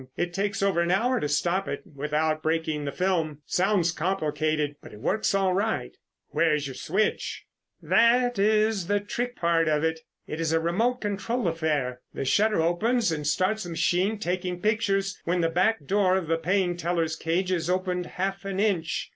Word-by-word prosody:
It 175 0 -1
takes 200 +1 -1
over 190 -4 +2
an 170 - 0
hour 240 +7 +2
to 150 - -2
stop 175 +6 0
it - - -4
without 155 0 -1
breaking 155 -2 -1
the 140 - -2
film. 160 -4 -1
It - - -22
sounds 185 -2 +2
complicated, 155 -4 -1
but - - -12
it 105 - -11
works 215 - 0
all 190 -1 +2
right." 210 +4 -1 0.3
"Where 160 -2 +2
is 150 -1 -2
your 135 - -5
switch?" 195 +11 -1 0.4
"That 245 -1 +3
is 215 -2 +2
the 205 +1 +2
trick 245 +4 -4
part 165 -1 +2
of 150 0 +1
it. 160 0 0 0.3
It 155 - -5
is 160 -1 0
a 165 - +3
remote 225 +10 0
control 210 +2 -2
affair. 150 -6 -1
The - - -3
shutter 210 +4 +3
opens 215 +5 +1
and 150 -2 -2
starts 185 +8 +1
the - - -6
machine 175 +6 +1
taking 180 -2 -2
pictures 200 -1 0
when 175 +1 +1
the 165 - +2
back 180 0 +1
door 190 +1 +3
of 190 - -2
the 165 +1 +1
paying 180 +1 0
teller's 165 -2 -1
cage 175 +4 -1
is 175 -2 -1
opened 180 -1 -1
half 195 +1 -3
an 195 -1 -3
inch. 185 -6 0
180 Hz, 190 wpm, -26 LUFS, 160-200 Hz, 0.4 s, That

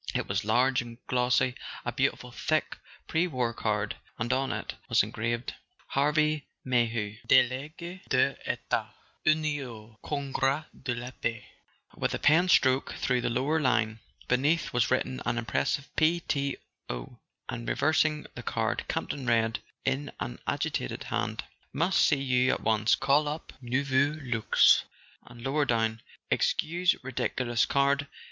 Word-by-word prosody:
It - - -1
was - - -1
large 125 +5 +3
and 120 -1 -9
glossy, 125 0 +2 0.3
a - - -1
beautiful 125 - -1
thick 155 +6 0 0.3
pre 165 +3 +1
war 125 -7 -1
card; 105 -2 -1 0.2
and 120 +3 0
on 135 0 0
it - - -4 0.2
was - - +5
engraved: 115 +2 -3 0.4
HARVEY 150 +1 +2 0.2
MAYHEW 115 -4 0
DelSguS 155 +8 +1
des 130 +1 +3
Etats - - -2 0.3
Unis 155 -2 +2
au 110 -4 -10
Congrfa 140 +1 -1 0.2
de 125 -3 -1
la 120 +2 -6
Paix 115 -3 -3 0.5
with - - -1
a - - -1
pen 170 +5 +4
stroke 130 -5 +4
through 125 -1 0
the - - 0
lower 135 +7 +1
line. 115 -5 +1 0.3
Beneath 145 +7 +1
was 120 - +2
written 130 0 0
an 120 0 -1
imperative 120 +4 -1
"p.t.o."; 140 - -2 0.3
and - - -4
reversing 155 - +2
the - - -7
card, - - -1
Campton 135 -3 -3
read, 115 -1 +2 0.3
in 135 +2 -1
an - - -5
agitated - - -2
hand: - - -2 0.3
"Must 170 +6 +2
see 140 -3 +3
you 130 -1 +3
at - - -3
once. 110 0 +3
Call 140 +2 +3
up 150 +2 -5
Nouveau 135 +3 +1
Luxe"; 115 -4 +4 0.4
and, 120 -1 -12
lower 145 +2 +1
down: 115 -2 0 0.3
"Excuse 175 +3 +2
ridiculous 120 -2 0
card. 140 +1 +2
130 Hz, 140 wpm, -29 LUFS, 120-145 Hz, 0.5 s, was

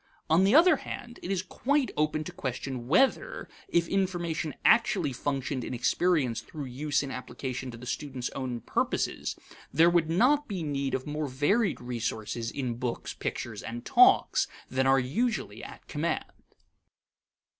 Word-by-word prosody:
On 165 +4 +6
the 200 +7 +4
other 330 -1 +7
hand, 240 -1 -8
it - - -6
is 185 -2 0
quite 275 +8 0
open 155 0 0
to - - -7
question 130 -1 -4
whether, 270 - +2 0.2
if 170 0 +2
information 170 -6 -1
actually 195 - +4
functioned 135 0 -2
in 125 - -4
experience 130 -2 +1
through 145 +4 -7
use 145 +3 -1
in 135 - -5
application 130 0 -5
to 115 - -8
the 120 - -10
student's 130 -1 -4
own 125 -3 -4
purposes, - - -1 0.4
there 165 +2 +5
would 170 -2 +2
not 270 - +3
be 190 -5 -3
need 140 -3 -1
of 130 - -4
more 150 0 -2
varied 165 - +1
resources 115 -1 -3
in 125 -4 -3
books, 120 -1 -3
pictures, 105 -4 -4
and 120 +1 -6
talks - - +5 0.2
than 130 0 +2
are 135 0 +5
usually 215 - -1
at - - -11
command. - - -1
145 Hz, 155 wpm, -29 LUFS, 125-185 Hz, 0.4 s, other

